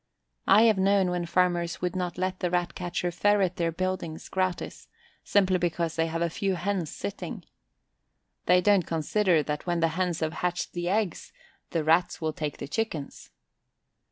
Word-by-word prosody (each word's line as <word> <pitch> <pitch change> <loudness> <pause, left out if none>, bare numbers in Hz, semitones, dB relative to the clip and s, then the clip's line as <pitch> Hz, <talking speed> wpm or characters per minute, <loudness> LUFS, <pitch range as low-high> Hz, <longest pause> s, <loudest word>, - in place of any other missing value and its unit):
I 205 +3 +7
have 220 -4 +4
known 195 -1 +3
when 175 -1 -2
farmers 175 -1 +1
would 180 +1 -2
not 180 -2 -2
let 185 0 -2
the 180 - 0
Rat 175 -1 0
catcher 175 -1 -2
ferret 195 -1 +2
their 170 -1 0
buildings 180 -2 -3
gratis, 185 -1 -2 0.4
simply 190 -2 +3
because 170 -1 -1
they 165 0 +1
have 165 +1 -1
a 170 - +1
few 195 +2 -1
hens 180 -2 -2
sitting. 100 - -6 1.0
They 180 +1 +5
don't 200 -2 +3
consider 165 +1 +2
that 150 +4 -4
when 175 -1 +1
the 165 0 +3
hens 175 0 -1
have 160 0 -1
hatched 175 0 -1
the 175 0 -2
eggs 200 -3 -1 0.4
the 165 -2 -1
Rats 165 +3 +2
will 160 -1 -2
take 150 -2 -4
the - - -6
chickens. 160 -5 -4
175 Hz, 170 wpm, -27 LUFS, 165-185 Hz, 1.0 s, I